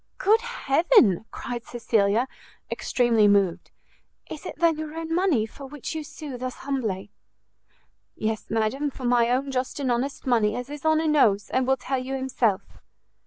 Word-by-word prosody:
"Good 435 Hz, +3 st, +3 dB
heaven!" 325 Hz, -, +3 dB
cried 240 Hz, -1 st, -6 dB
Cecilia, 230 Hz, -1 st, +1 dB, 0.4 s
extremely 230 Hz, -4 st, +2 dB
moved, 195 Hz, -3 st, +2 dB, 0.6 s
"is -, -, -7 dB
it -, -, -6 dB
then 330 Hz, -2 st, +2 dB
your 310 Hz, 0 st, -6 dB
own 325 Hz, 0 st, -4 dB
money 335 Hz, -, +2 dB
for 270 Hz, +5 st, -11 dB
which 285 Hz, -1 st, -6 dB
you 315 Hz, -1 st, -4 dB
sue 290 Hz, -4 st, -8 dB
thus 255 Hz, 0 st, -4 dB
humbly?" 220 Hz, -8 st, -2 dB, 1.0 s
"Yes, 220 Hz, 0 st, -3 dB
madam, 225 Hz, +7 st, 0 dB
for 270 Hz, -, -11 dB
my 240 Hz, -1 st, +3 dB
own 265 Hz, +3 st, 0 dB
just 255 Hz, +2 st, -2 dB
and 265 Hz, -3 st, 0 dB
honest 255 Hz, +4 st, -2 dB
money, 225 Hz, -5 st, +2 dB
as 250 Hz, +2 st, -5 dB
his 295 Hz, +2 st, -4 dB
honour 315 Hz, 0 st, +3 dB
knows, 225 Hz, -10 st, +3 dB
and 260 Hz, 0 st, +1 dB
will 265 Hz, 0 st, +3 dB
tell 260 Hz, +1 st, -2 dB
you 260 Hz, +1 st, -4 dB
himself." 250 Hz, -6 st, -1 dB
255 Hz, 165 wpm, -25 LUFS, 225-295 Hz, 1.0 s, Good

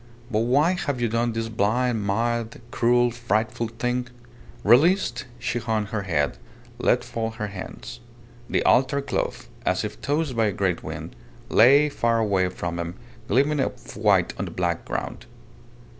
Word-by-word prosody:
But 110 Hz, -, +2 dB
why 135 Hz, +9 st, +3 dB
have 145 Hz, -8 st, -2 dB
you 120 Hz, -, +1 dB
done 115 Hz, +1 st, 0 dB
this 115 Hz, 0 st, -2 dB
blind, 110 Hz, +1 st, 0 dB
mad, 115 Hz, +2 st, -1 dB
cruel, 120 Hz, 0 st, +3 dB
frightful 115 Hz, -1 st, -1 dB
thing?" 125 Hz, +2 st, -2 dB, 0.6 s
Released, 125 Hz, -, +4 dB
she 120 Hz, 0 st, -2 dB
hung 110 Hz, -2 st, -1 dB
her 110 Hz, 0 st, -3 dB
head, 75 Hz, -7 st, -1 dB, 0.4 s
let -, -, +2 dB
fall 115 Hz, -1 st, -3 dB
her 110 Hz, -1 st, -5 dB
hands. 95 Hz, -2 st, -8 dB, 0.5 s
The -, -, +1 dB
altar 135 Hz, +2 st, +3 dB
cloth, -, -, -3 dB, 0.2 s
as -, -, +1 dB
if -, -, -6 dB
tossed 145 Hz, -2 st, -1 dB
by 115 Hz, -1 st, +3 dB
a 105 Hz, -, -1 dB
great 90 Hz, -2 st, 0 dB
wind, -, -, -7 dB, 0.3 s
lay 140 Hz, +6 st, +6 dB
far 115 Hz, -5 st, +1 dB
away 100 Hz, -5 st, +2 dB
from 85 Hz, -1 st, -4 dB
them, 85 Hz, +1 st, -4 dB, 0.3 s
gleaming 140 Hz, +4 st, +2 dB
white 135 Hz, -, +1 dB
on -, -, -1 dB
the -, -, -5 dB
black 85 Hz, -2 st, -2 dB
ground. -, -, -5 dB
115 Hz, 155 wpm, -24 LUFS, 105-125 Hz, 0.6 s, lay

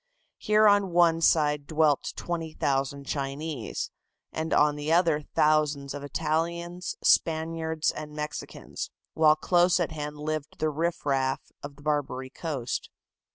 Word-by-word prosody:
Here 215 Hz, 0 st, +4 dB
on 205 Hz, -2 st, +4 dB
one 170 Hz, -1 st, +4 dB
side 150 Hz, -3 st, +3 dB
dwelt 155 Hz, -3 st, +2 dB
20,000 140 Hz, -5 st, -2 dB
Chinese, 140 Hz, -2 st, -4 dB, 0.4 s
and 160 Hz, +1 st, -3 dB
on 150 Hz, 0 st, +4 dB
the 150 Hz, +1 st, -3 dB
other 165 Hz, -3 st, +3 dB
thousands 150 Hz, -2 st, +2 dB
of 145 Hz, -, -6 dB
Italians, 170 Hz, +4 st, -2 dB
Spaniards 160 Hz, 0 st, +2 dB
and 150 Hz, -1 st, -7 dB
Mexicans, 150 Hz, 0 st, -6 dB, 0.2 s
while 155 Hz, -1 st, +5 dB
close 175 Hz, +3 st, +3 dB
at 170 Hz, -2 st, -1 dB
hand 150 Hz, -1 st, -5 dB
lived 155 Hz, 0 st, -4 dB
the 155 Hz, 0 st, 0 dB
riff 165 Hz, +2 st, -2 dB
raff 135 Hz, -2 st, 0 dB
of 145 Hz, 0 st, -8 dB
the 145 Hz, -, -17 dB
"Barbary 135 Hz, -3 st, -2 dB
Coast." 140 Hz, -7 st, -4 dB
155 Hz, 130 wpm, -27 LUFS, 145-165 Hz, 0.4 s, while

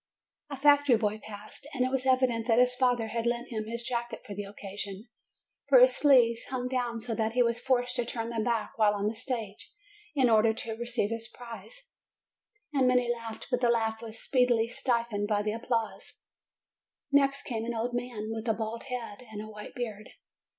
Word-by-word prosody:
A 280 Hz, -, -5 dB
factory 285 Hz, -2 st, +6 dB
boy 215 Hz, -1 st, -1 dB
passed, 215 Hz, +6 st, -9 dB
and 255 Hz, -1 st, +2 dB
it 255 Hz, -, -1 dB
was 265 Hz, 0 st, 0 dB
evident 255 Hz, -3 st, +2 dB
that 230 Hz, -2 st, +4 dB
his 250 Hz, 0 st, +5 dB
father 245 Hz, -3 st, +1 dB
had 230 Hz, +1 st, -1 dB
lent 240 Hz, +1 st, -1 dB
him 220 Hz, -2 st, -3 dB
his 235 Hz, +1 st, -3 dB
jacket 235 Hz, -1 st, -3 dB
for 210 Hz, -, -7 dB
the 205 Hz, +1 st, -5 dB
occasion, 200 Hz, +1 st, -7 dB, 0.6 s
for -, -, +8 dB
his -, -, +7 dB
sleeves 240 Hz, -5 st, +4 dB
hung 250 Hz, -1 st, -3 dB
down 245 Hz, -2 st, -1 dB
so 225 Hz, +1 st, -3 dB
that 220 Hz, 0 st, -1 dB
he 245 Hz, 0 st, +4 dB
was 235 Hz, 0 st, 0 dB
forced 250 Hz, -1 st, +1 dB
to 245 Hz, -, 0 dB
turn 230 Hz, -1 st, -3 dB
them 225 Hz, -2 st, -1 dB
back 230 Hz, -2 st, -1 dB
while 210 Hz, -1 st, +4 dB
on 200 Hz, 0 st, -2 dB
the 215 Hz, +2 st, 0 dB
stage, 225 Hz, -4 st, -5 dB, 0.4 s
in 265 Hz, -3 st, +4 dB
order 220 Hz, -1 st, +4 dB
to 225 Hz, 0 st, -4 dB
receive 235 Hz, -2 st, -1 dB
his 230 Hz, 0 st, -4 dB
prize: 250 Hz, -, -11 dB, 0.7 s
and 270 Hz, -3 st, +3 dB
many 250 Hz, -1 st, +3 dB
laughed; 230 Hz, -2 st, -8 dB
but 250 Hz, 0 st, +1 dB
the 240 Hz, -, +3 dB
laugh 225 Hz, -1 st, +1 dB
was 225 Hz, -1 st, -7 dB
speedily 245 Hz, -3 st, +2 dB
stifled 235 Hz, -4 st, -1 dB
by 205 Hz, -1 st, +1 dB
the 210 Hz, 0 st, -1 dB
applause. 230 Hz, -1 st, -3 dB, 1.0 s
Next 275 Hz, 0 st, +3 dB
came 225 Hz, -3 st, -3 dB
an 235 Hz, 0 st, -3 dB
old 235 Hz, +2 st, -2 dB
man 240 Hz, -3 st, -3 dB
with 225 Hz, +1 st, -4 dB
a 225 Hz, -, +2 dB
bald 225 Hz, +1 st, -4 dB
head 245 Hz, -4 st, -5 dB
and 210 Hz, -, -6 dB
a 215 Hz, -, -5 dB
white 210 Hz, 0 st, -10 dB
beard. 215 Hz, -4 st, -5 dB
235 Hz, 200 wpm, -29 LUFS, 220-250 Hz, 1.0 s, for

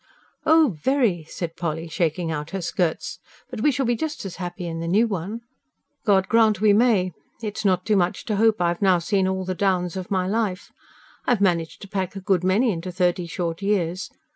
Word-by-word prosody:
"Oh, 315 Hz, -, +5 dB
very," 235 Hz, -, +1 dB
said 165 Hz, +1 st, -5 dB
Polly, 165 Hz, -1 st, -3 dB
shaking 165 Hz, 0 st, -1 dB
out 150 Hz, 0 st, -4 dB
her 195 Hz, -1 st, -4 dB
skirts. 170 Hz, -1 st, -1 dB, 0.3 s
"But 240 Hz, -4 st, -5 dB
we 295 Hz, -, +4 dB
shall 270 Hz, -1 st, 0 dB
be 240 Hz, 0 st, +2 dB
just 300 Hz, -2 st, -4 dB
as 190 Hz, -, -6 dB
happy 180 Hz, -1 st, -5 dB
in 165 Hz, -1 st, -4 dB
the 165 Hz, -, -3 dB
new 205 Hz, +7 st, +4 dB
one." 205 Hz, +2 st, -4 dB, 0.6 s
"God 190 Hz, -3 st, +3 dB
grant 220 Hz, -4 st, +4 dB
we 210 Hz, 0 st, +5 dB
may! 205 Hz, -5 st, +3 dB, 0.3 s
It's 210 Hz, 0 st, -4 dB
not 185 Hz, -3 st, +2 dB
too 215 Hz, -, +2 dB
much 180 Hz, -2 st, 0 dB
to 210 Hz, -3 st, -1 dB
hope 220 Hz, -1 st, +3 dB
I've 175 Hz, +1 st, 0 dB
now 190 Hz, -2 st, +5 dB
seen 185 Hz, +3 st, +1 dB
all 190 Hz, 0 st, -2 dB
the 185 Hz, -, -2 dB
downs 180 Hz, -2 st, 0 dB
of 185 Hz, -1 st, -5 dB
my 185 Hz, -2 st, +1 dB
life. 205 Hz, -2 st, -2 dB, 0.6 s
I've 245 Hz, -4 st, +3 dB
managed 170 Hz, -4 st, 0 dB
to -, -, -8 dB
pack 190 Hz, -1 st, -3 dB
a -, -, -4 dB
good 190 Hz, -2 st, +1 dB
many 210 Hz, +6 st, +3 dB
into 180 Hz, 0 st, -4 dB
thirty 180 Hz, -1 st, 0 dB
short 170 Hz, 0 st, -3 dB
years. 185 Hz, -3 st, 0 dB
190 Hz, 205 wpm, -23 LUFS, 175-215 Hz, 0.6 s, Oh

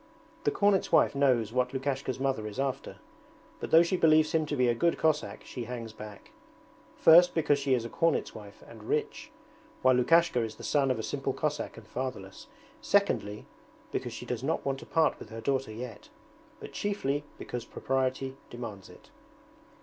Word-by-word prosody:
The -, -, +5 dB
cornet's 200 Hz, -2 st, +2 dB
wife -, -, +5 dB
knows 125 Hz, -6 st, +2 dB
what 125 Hz, 0 st, 0 dB
Lukashka's 135 Hz, -1 st, -2 dB
mother 135 Hz, -5 st, -1 dB
is 105 Hz, +4 st, -7 dB
after, 135 Hz, -1 st, -2 dB, 0.6 s
but -, -, -5 dB
though 165 Hz, +1 st, +7 dB
she 170 Hz, +2 st, 0 dB
believes 155 Hz, -2 st, +4 dB
him 160 Hz, -2 st, +1 dB
to 145 Hz, -, -2 dB
be 125 Hz, -2 st, +2 dB
a 120 Hz, -, +3 dB
good 170 Hz, +8 st, +1 dB
Cossack 155 Hz, -1 st, 0 dB
she 120 Hz, -3 st, -6 dB
hangs 115 Hz, -2 st, -6 dB
back: 105 Hz, -2 st, -11 dB, 0.7 s
first 175 Hz, +2 st, +7 dB
because 150 Hz, -3 st, +2 dB
she 140 Hz, -2 st, +2 dB
is 120 Hz, -2 st, -2 dB
a -, -, -5 dB
cornet's 165 Hz, +5 st, 0 dB
wife 105 Hz, -1 st, -12 dB
and 110 Hz, -2 st, -12 dB
rich, -, -, -2 dB, 0.5 s
while 130 Hz, 0 st, +6 dB
Lukashka 165 Hz, +3 st, +4 dB
is 110 Hz, -1 st, -4 dB
the -, -, -12 dB
son 140 Hz, -2 st, +2 dB
of 130 Hz, -, +1 dB
a 110 Hz, -, -4 dB
simple 135 Hz, +1 st, -2 dB
Cossack 150 Hz, +1 st, -3 dB
and 110 Hz, -1 st, -12 dB
fatherless, 115 Hz, -6 st, -6 dB, 0.3 s
secondly 110 Hz, -, +1 dB, 0.5 s
because -, -, -3 dB
she -, -, -7 dB
does 120 Hz, -2 st, -3 dB
not 150 Hz, +5 st, -1 dB
want 135 Hz, -1 st, -1 dB
to -, -, -12 dB
part 160 Hz, -1 st, +2 dB
with -, -, -10 dB
her 115 Hz, +1 st, -7 dB
daughter 135 Hz, -1 st, -1 dB
yet, 115 Hz, 0 st, -8 dB, 0.5 s
but -, -, -10 dB
chiefly 150 Hz, -9 st, -1 dB
because 120 Hz, -1 st, -5 dB
propriety 130 Hz, 0 st, -2 dB
demands 110 Hz, -5 st, -8 dB
it. -, -, -17 dB
130 Hz, 180 wpm, -29 LUFS, 115-150 Hz, 0.7 s, though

